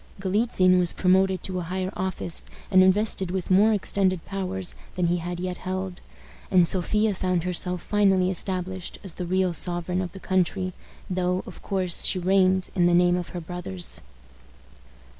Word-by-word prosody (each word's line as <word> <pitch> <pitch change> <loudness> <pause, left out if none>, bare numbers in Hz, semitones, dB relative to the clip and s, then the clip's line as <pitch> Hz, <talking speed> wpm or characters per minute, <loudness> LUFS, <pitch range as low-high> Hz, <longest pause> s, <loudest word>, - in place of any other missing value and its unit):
Galitzin 190 -2 +3
was 175 -2 +1
promoted 190 0 +2
to 185 -1 -3
a - - -3
higher 185 +2 -3
office, 100 - -4 0.3
and 185 - +6
invested 190 0 +2
with 185 0 -3
more 205 +4 +5
extended 190 -3 0
powers 190 -1 -4 0.2
than 180 - 0
he 175 +1 +1
had 175 +1 -5
yet 180 0 -3
held, 185 0 -5 0.5
and 180 -2 +5
Sophia 210 +4 +1
found 185 -2 -1
herself 180 0 -2
finally 190 -3 +2
established 185 0 -2
as 190 -4 -4
the 180 0 -5
real 185 0 +1
sovereign 175 +1 +1
of 180 -2 -4
the 195 - -9
country, 185 0 0 0.3
though, 180 0 -1
of - - -11
course, 185 -3 0
she - - +4
reigned, 185 0 +2
in 175 -2 +3
the 175 - +4
name 175 0 +4
of 180 -1 -4
her 180 - -5
brothers. 160 - -5
185 Hz, 165 wpm, -25 LUFS, 180-190 Hz, 0.5 s, and